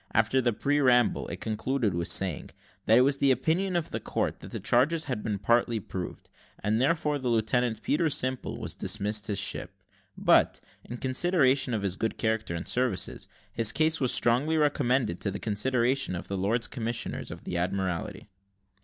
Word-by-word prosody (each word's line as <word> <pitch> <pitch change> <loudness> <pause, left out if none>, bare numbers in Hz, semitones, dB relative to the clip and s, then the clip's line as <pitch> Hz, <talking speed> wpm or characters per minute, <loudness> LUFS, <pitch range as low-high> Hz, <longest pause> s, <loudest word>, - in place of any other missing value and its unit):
After 115 +4 +3
the 120 -1 +2
preamble, 130 -1 +2
it 85 +2 -7
concluded 110 +1 -1
with 85 0 -2
saying; 95 -6 0 0.4
"that 110 - +6
it - - +7
was 135 +2 +2
the 140 - +3
opinion 165 +9 +1
of 170 -2 -1
that - - -4
court - - -2
that - - -10
the - - -5
charges 155 +7 +2
had 130 -8 -3
been 105 -2 -2
partly 115 +2 +2
proved, 95 -2 -7 0.4
and 110 +3 +1
therefore, 150 0 +1
that 130 -2 -2
Lieutenant 115 0 +1
Peter 160 +2 +1
Simple 130 -2 -3
was - - -4
dismissed 105 0 -2
his 105 - -2
ship; - - -3 0.4
but, - - +4 0.2
in 120 - -7
consideration 130 -2 +2
of 105 - -3
his 95 -2 -1
good 110 +3 -2
character 110 -5 -1
and 85 - -5
services, 125 -8 -1 0.3
his 115 -1 +1
case 155 +3 +1
was 130 - +2
strongly 135 +7 +2
recommended 130 - +1
to 100 - -1
the 100 - -4
consideration 125 +2 0
of 85 - -6
the 100 - -3
Lords 105 +5 0
Commissioners 115 -2 -3
of - - -9
the - - -5
Admiralty." 90 -1 -2
120 Hz, 180 wpm, -28 LUFS, 105-135 Hz, 0.4 s, it